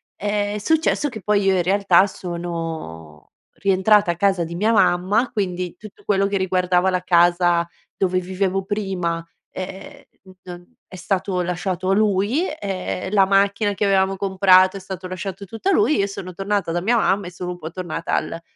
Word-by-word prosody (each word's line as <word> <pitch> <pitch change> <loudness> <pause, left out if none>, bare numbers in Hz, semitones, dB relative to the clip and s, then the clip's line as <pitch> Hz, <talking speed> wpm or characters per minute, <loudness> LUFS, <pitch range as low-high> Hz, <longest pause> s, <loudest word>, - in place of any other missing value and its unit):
ehm, 205 0 -2
è - - -2
successo 315 +3 +1
che 220 -4 -9
poi 205 +1 +1
io 195 -1 +2
in - - +2
realtà 190 +1 +3
sono 165 - -7 0.2
rientrata 195 0 +3
a - - -4
casa 190 -1 +1
di 170 +1 -7
mia 215 +5 +1
mamma, 195 +4 +2
quindi 180 -5 -3
tutto 215 -2 -14
quello 195 -1 +2
che 200 0 -1
riguardava 185 0 +1
la 180 -1 0
casa 175 -1 +3 0.3
dove 185 -1 +1
vivevo 190 +1 -1
prima, 190 -5 -2 0.3
ehm, 190 +1 -8 0.4
non 175 +4 -11
è - - -12
stato 185 0 -2
lasciato 180 +1 -2
a - - +4
lui, 210 - +1 0.2
ehm, 190 -1 -4
la 195 -2 +4
macchina 200 +1 +2
che 205 +2 -3
avevamo 195 -1 +2
comprato, 190 0 +4
è - - -7
stato 185 -1 -7
lasciato 185 +1 -6
tutto 225 - -4
lui, 370 -6 +3
e - - 0
io 200 - 0
sono 190 -2 -7
tornata 195 -1 -2
da 175 - 0
mia 220 +7 +1
mamma 200 -4 +1
e - - -8
sono 180 0 -6
un 175 - -7
po' 160 0 -7
tornata 170 -2 -3
al 165 - -3
190 Hz, 180 wpm, -21 LUFS, 180-200 Hz, 0.4 s, a